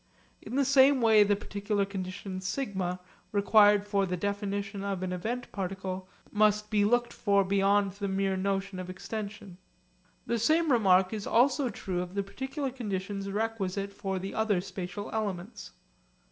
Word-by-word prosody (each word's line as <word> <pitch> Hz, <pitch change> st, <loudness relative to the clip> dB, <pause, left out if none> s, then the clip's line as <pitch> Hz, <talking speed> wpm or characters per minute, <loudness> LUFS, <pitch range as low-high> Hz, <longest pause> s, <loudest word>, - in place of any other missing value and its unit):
In -, -, -7 dB
the 280 Hz, 0 st, +3 dB
same 275 Hz, 0 st, +5 dB
way 220 Hz, -3 st, +6 dB
the 205 Hz, 0 st, +4 dB
particular 205 Hz, 0 st, -2 dB
condition 185 Hz, -1 st, -5 dB
'σ' 185 Hz, -3 st, -2 dB, 0.3 s
required 205 Hz, 0 st, +5 dB
for 200 Hz, -2 st, +1 dB
the 180 Hz, 0 st, -2 dB
definition 200 Hz, +1 st, -3 dB
of 195 Hz, -2 st, -2 dB
an 185 Hz, -1 st, -2 dB
event 230 Hz, +7 st, -4 dB
particle 190 Hz, -1 st, -4 dB, 0.2 s
must 210 Hz, 0 st, +2 dB
be 210 Hz, -1 st, +3 dB
looked 240 Hz, +3 st, +2 dB
for 200 Hz, -2 st, +2 dB
beyond 200 Hz, +1 st, +2 dB
the 200 Hz, +1 st, -4 dB
mere 195 Hz, 0 st, 0 dB
notion 195 Hz, 0 st, -2 dB
of 185 Hz, 0 st, -6 dB
extension. 200 Hz, -1 st, -7 dB, 0.7 s
The 235 Hz, -, -1 dB
same 315 Hz, +6 st, +3 dB
remark 190 Hz, -5 st, +4 dB
is 210 Hz, -2 st, -4 dB
also 255 Hz, +2 st, +3 dB
true 185 Hz, -4 st, -3 dB
of 180 Hz, +1 st, -7 dB
the 200 Hz, -, 0 dB
particular 265 Hz, +6 st, -4 dB
conditions 200 Hz, -4 st, -4 dB
requisite 200 Hz, -2 st, -2 dB
for 195 Hz, -1 st, -3 dB
the 190 Hz, +1 st, -5 dB
other 220 Hz, -4 st, +1 dB
spatial 185 Hz, +1 st, -6 dB
elements. 205 Hz, -1 st, -4 dB
200 Hz, 155 wpm, -29 LUFS, 190-220 Hz, 0.7 s, way